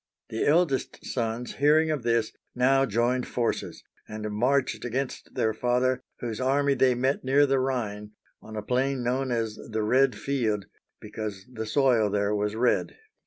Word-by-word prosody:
The 110 - -1
eldest 150 -3 +1
sons, 120 0 -3
hear 150 +2 +5
ing 160 0 +1
of 150 -4 -1
this, 115 -1 +1 0.2
now 135 +2 +3
joined 120 +3 0
forces 120 -2 -2 0.2
and 110 0 -5
marched 130 +6 +1
against 130 +2 -4
their 110 0 +1
father, 125 +3 +1 0.2
whose 115 -1 -4
army 140 +2 +2
they 130 -2 +3
met 130 +3 0
near 135 +2 +4
the 135 -1 +2
Rhine, 105 -5 -3 0.3
on 110 - -10
a 105 - -4
plain 130 +2 0
known 130 +2 0
as 115 -2 -2
the 110 -1 -1
Red 130 +4 +3
Field, 110 -8 -1 0.3
because 105 -3 -6
the 110 -2 -5
soil 120 -4 +3
there 100 +1 0
was 105 0 -1
red 120 +2 +1
(833). - - -29
125 Hz, 165 wpm, -27 LUFS, 110-135 Hz, 0.3 s, hear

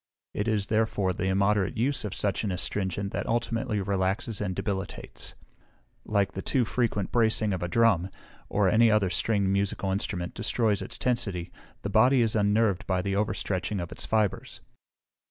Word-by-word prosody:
It 105 - -2
is, 105 -3 +1
therefore, 105 -3 +1
the 95 +1 -3
immoderate 100 +2 +1
use 130 +4 0
of 105 -3 -4
such 100 0 -1
an 105 - -1
astringent 95 +1 -2
that - - -2
ultimately 115 -1 -1
relaxes 95 +2 -1
and 95 -3 -2
debilitates: 100 -1 -4 0.7
like 100 -2 +1
the 95 - -5
too 125 +2 +1
frequent 110 -4 -1
bracing 110 -3 +2
of 90 - -3
a 90 - -1
drum, 95 -2 +3 0.4
or 100 -2 +2
any 115 +4 +5
other 105 -4 +2
stringed 100 -3 +1
musical 100 0 0
instrument, 95 -3 -2
destroys 110 -2 0
its - - -5
tensity, 100 -9 -1 0.3
the 100 - -2
body 125 +5 +5
is 110 -1 0
unnerved 105 -2 +2
by 95 -1 0
the 100 0 -1
overstretching 100 -1 -1
of 85 -1 -5
its - - -4
fibres. 110 -3 -1
100 Hz, 165 wpm, -27 LUFS, 95-110 Hz, 0.7 s, any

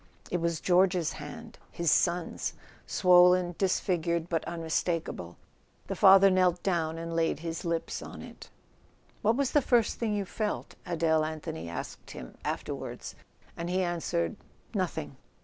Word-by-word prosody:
It 175 - 0
was 170 -1 0
George's 180 -2 +3
hand, 225 +10 -9
his 170 -2 0
son's, 175 -1 +1 0.3
swollen, 180 -1 +5
disfigured 170 -3 0
but 165 -2 0
unmistakable. 165 - -2 0.5
The - - -4
father 195 0 +7
knelt 180 -1 +2
down 165 -4 0
and 165 0 -5
laid 165 -2 +1
his 165 +1 -4
lips 165 -1 -2
on - - -9
it. - - -12 0.7
"What 220 +2 +3
was 275 -1 0
the 295 - +4
first 240 -3 +2
thing 220 -3 0
you 200 -1 -1
felt?" 210 +2 -3
Adele 160 -2 +2
Anthony 155 - -5
asked 85 - -7
him - - -9
afterward: - - -4 0.5
and 170 +1 -4
he 185 +1 +1
answered: 165 - -1 0.4
"Nothing." 75 -1 -3
170 Hz, 140 wpm, -29 LUFS, 165-185 Hz, 0.7 s, father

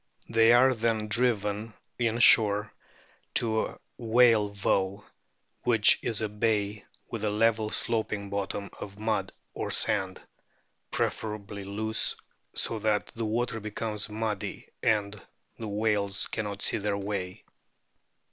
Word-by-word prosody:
They 115 0 +5
are 130 +2 +6
then 110 -2 -1
driven 110 -2 0 0.2
in 115 -1 +1
shore 105 -2 +5 0.6
to 110 -1 +2
a - - -13 0.2
whale 115 -2 +4
voe, 100 0 -1 0.6
which 115 -4 +5
is 115 -3 0
a 110 - 0
bay 105 -1 -1 0.3
with 115 -2 -4
a 105 - +1
level 110 +1 +2
sloping 105 -4 -2
bottom 100 0 -3
of 100 -1 -8
mud 105 -3 -1 0.2
or - - -4
sand, 95 -1 +1 0.7
preferably 105 -2 -3
loose, 110 +3 0 0.4
so 115 - +2
that 105 -1 0
the 115 -1 -3
water 115 +1 -1
becomes 105 0 -3
muddy 105 -1 -4
and 105 -2 0 0.4
the 115 - -5
whales 100 -1 +1
cannot 100 -2 -4
see - - +1
their 100 0 -1
way. 100 -2 -4
105 Hz, 125 wpm, -28 LUFS, 100-115 Hz, 0.7 s, are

